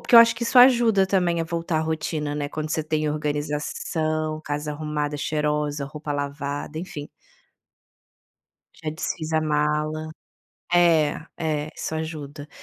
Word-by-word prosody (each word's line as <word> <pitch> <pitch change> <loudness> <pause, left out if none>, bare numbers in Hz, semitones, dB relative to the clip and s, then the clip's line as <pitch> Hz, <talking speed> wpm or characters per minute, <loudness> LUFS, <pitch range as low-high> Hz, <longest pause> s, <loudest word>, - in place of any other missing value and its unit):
porque - - +1
eu - - +13
acho 230 0 +8
que 235 - -6
isso 240 +2 +4
ajuda 235 -6 +6
também 175 -3 +2
a - - -3
voltar 165 0 -2
à - - +2
rotina, 155 -2 -2
né, 145 -1 -2
quando 155 +1 -4
você 160 - 0
tem 155 0 0
organização, 155 +1 -2
casa 150 +1 -3
arrumada 150 -1 -2
cheirosa, 150 -1 -1
roupa 150 +1 -7
lavada, 145 +1 -3
enfim. 165 -5 -6 1.8
Já 155 - 0
desfiz 155 +1 -4
a 160 - +3
mala. 150 +1 0 0.7
É, 165 -5 +4 0.2
é 155 -2 -1
isso - - -3
ajuda. 150 -2 -5
155 Hz, 145 wpm, -24 LUFS, 150-160 Hz, 1.8 s, eu